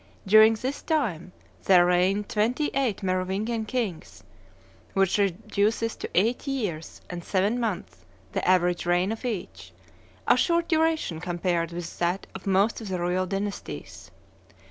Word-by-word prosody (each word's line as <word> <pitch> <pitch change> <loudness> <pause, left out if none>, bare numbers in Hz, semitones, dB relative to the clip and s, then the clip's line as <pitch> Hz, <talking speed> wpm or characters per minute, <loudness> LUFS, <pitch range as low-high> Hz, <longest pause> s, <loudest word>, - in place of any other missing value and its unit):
During 215 +3 +7
this 260 +6 -4
time 205 - -1 0.3
there 180 -2 +6
reigned 185 +3 +2
twenty 240 +8 0
eight 245 -8 0
Merovingian 190 +5 -1
kings, 215 -8 -4 0.7
which 195 +1 +2
reduces 205 +3 0
to - - -6
eight 230 +9 +1
years 205 - -3
and 175 -1 -6
seven 200 +7 +1
months 175 - -4 0.3
the - - -2
average 180 -1 +2
reign 175 +3 +2
of 225 - -5
each, 175 - -5 0.6
a - - +6
short 335 +6 +1
duration 320 - +1
compared 175 -1 -1
with 170 -1 -7
that 175 +3 0
of 195 - -9
most 195 +5 +2
of 220 - -7
the 185 -1 -2
royal 180 +2 0
dynasties. 200 +1 -5
195 Hz, 140 wpm, -26 LUFS, 180-225 Hz, 0.7 s, During